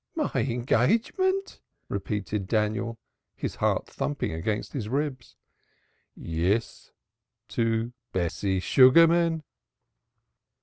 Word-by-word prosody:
"My 310 -2 -1
engagement!" 225 - +1 0.3
repeated 100 0 -3
Daniel, 110 +2 0 0.4
his - - -5
heart - - +1
thumping 145 -1 -3
against 105 +7 -3
his 110 -6 -4
ribs. 135 -2 -3 0.8
"Yes 90 +8 -2 0.6
to 115 +2 0 0.2
Bessie 95 +2 -1
Sugarman." 165 - +5
115 Hz, 80 wpm, -27 LUFS, 105-150 Hz, 0.8 s, Sugarman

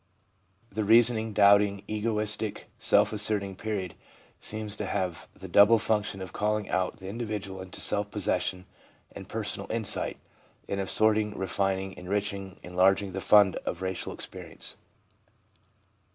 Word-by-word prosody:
The 110 +2 -2
reasoning, 115 +1 +4
doubting, 100 -1 +4
egoistic, 105 -1 -2
self - - +3
asserting 105 -2 -1
period 100 -4 -4 0.5
seems 110 -1 -4
to 105 - -3
have 90 -4 -2
the - - -9
double 105 +3 +6
function 105 -3 -1
of 95 - -9
calling 105 0 -1
out 95 +4 -1
the 95 - -7
individual 105 -3 -5
into 95 -1 -7
self 105 0 +1
possession 95 -2 -1 0.5
and - - -10
personal - - -3
insight, - - 0 0.5
and 100 - -2
of 95 - -3
sorting, 110 -1 +2
refining, 95 0 -1
enriching, 100 0 -3
enlarging 95 +2 +2
the 95 +1 -4
fund 100 -2 +5
of 90 +2 -5
racial 95 0 -3
experience. - - -6
100 Hz, 130 wpm, -28 LUFS, 95-105 Hz, 0.5 s, double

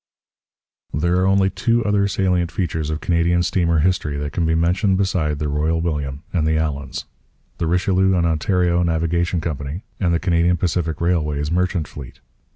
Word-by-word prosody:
There 85 +4 +1
are 95 - +2
only 95 0 +3
two 115 +3 +1
other 100 -1 +2
salient 90 -3 0
features 80 -3 -2
of 80 0 -3
Canadian 85 0 +2
steamer 85 -1 +1
history 85 -4 0
that 75 0 -4
can 85 -2 0
be 80 - +2
mentioned 90 +4 +2
beside 85 -6 0
the 75 0 -2
Royal 75 +3 0
William 75 -3 -3
and 80 -4 +1
the 80 0 +2
Allans: 75 -3 -3 0.5
the 85 - 0
Richelieu 95 +2 +2
and 85 -1 +2
Ontario 85 +2 +1
Navigation 85 +1 0
Company 75 +2 -4 0.2
and 90 -3 +1
the 85 - +2
Canadian 85 0 +2
Pacific 85 -2 -1
Railway's 75 -4 0
merchant 90 -2 0
fleet. 65 -4 -10
85 Hz, 165 wpm, -21 LUFS, 80-90 Hz, 0.5 s, only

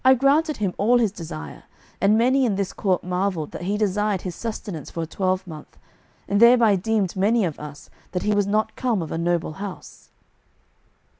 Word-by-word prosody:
I 260 +1 +7
granted 290 +4 +2
him 195 -4 -1
all 235 +5 +4
his 225 -5 +2
desire, 75 - -8 0.4
and 205 +2 +4
many 260 +4 +3
in 225 -6 +1
this 195 -1 -2
court 190 -3 0
marvelled 180 -3 -2
that - - -7
he 200 +4 -1
desired 210 -1 0
his 180 - -4
sustenance 205 - -6
for 165 - -4
a - - -3
twelvemonth, 185 -2 -3 0.5
and 200 - +1
thereby 235 -2 +6
deemed 205 -1 0
many 210 +3 +2
of 160 -4 -4
us 150 -1 -10 0.2
that 180 - -2
he 210 - +1
was 205 -1 +1
not 215 +2 0
come 235 -8 0
of 160 - -8
a - - -2
noble 170 -2 0
house." 200 -3 -9
200 Hz, 190 wpm, -23 LUFS, 180-220 Hz, 0.5 s, I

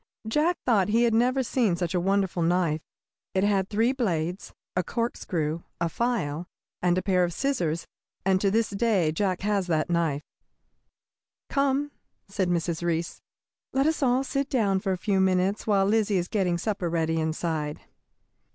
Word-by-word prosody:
Jack 305 +9 +2
thought 205 -6 +3
he 230 +3 +3
had 235 -1 +3
never 250 +4 +3
seen 230 -5 +1
such 175 0 -2
a 180 - +2
wonderful 190 -1 +1
knife. 165 -2 +1 0.5
It 190 - +2
had 195 -2 +2
three 225 +4 +2
blades, 180 - -2 0.2
a 180 - +1
corkscrew, 170 -8 -2 0.2
a 170 0 0
file, 175 -8 -1 0.3
and 180 0 +2
a 185 - 0
pair 185 -2 +3
of 175 -1 -1
scissors, 170 - -1 0.4
and 190 -1 +3
to 200 - +3
this 220 +2 +1
day 200 -6 +2
Jack 185 +2 -1
has 200 -2 0
that 160 0 0
knife. 160 -4 0 1.3
"Come," 280 +1 +1 0.4
said 195 -2 -1
Mrs. 170 -1 -1
Reece, 170 -1 -2 0.5
"let 270 +1 +2
us 315 0 +1
all 255 0 +3
sit 275 +1 -2
down 200 -7 +2
for 190 - -2
a 185 - 0
few 195 +1 0
minutes 190 +2 +1
while 200 -2 +3
Lizzie 210 -1 +2
is 175 -1 -1
getting 180 -4 0
supper 190 -2 -2
ready 165 -1 0
inside." 155 -1 -2
190 Hz, 165 wpm, -26 LUFS, 170-225 Hz, 1.3 s, thought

